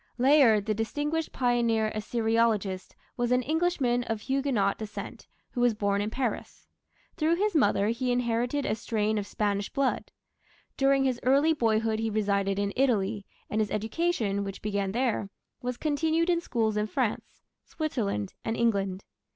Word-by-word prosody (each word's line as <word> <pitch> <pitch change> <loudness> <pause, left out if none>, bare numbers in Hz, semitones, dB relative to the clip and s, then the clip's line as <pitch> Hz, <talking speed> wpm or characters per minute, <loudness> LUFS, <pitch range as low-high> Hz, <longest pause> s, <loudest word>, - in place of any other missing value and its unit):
Layard, 250 -6 +5
the 215 - +1
distinguished 295 +9 -2
pioneer 235 -3 +1
Assyriologist, 220 -3 0 0.2
was 240 0 0
an 250 0 +3
Englishman 295 -6 +1
of 225 -2 -3
Huguenot 265 -6 0
descent, 215 -1 -7 0.2
who 245 - -2
was 245 -2 +3
born 200 -1 0
in 210 - -1
Paris. 245 0 -4 0.5
Through 320 +2 +2
his 410 +3 0
mother 205 -8 +3
he 245 +2 -1
inherited 245 +3 0
a - - +1
strain 215 -1 -1
of 200 - -5
Spanish 205 -1 -1
blood. 275 -2 -1 0.7
During 275 0 +3
his 255 -2 0
early 280 +5 +4
boyhood 225 -4 +1
he 225 0 -1
resided 200 -2 0
in 200 0 -1
Italy, 215 -6 +1 0.2
and 215 - 0
his 210 - -1
education, 220 - -1
which 195 -1 -7
began 200 -2 -1
there, 230 -3 0 0.3
was 250 0 -3
continued 320 +4 +1
in 340 -1 +1
schools 220 -8 -1
in 210 0 0
France, 240 -1 -3 0.2
Switzerland, 215 - -3
and 225 0 -2
England. 195 -5 0
230 Hz, 150 wpm, -28 LUFS, 210-270 Hz, 0.7 s, Layard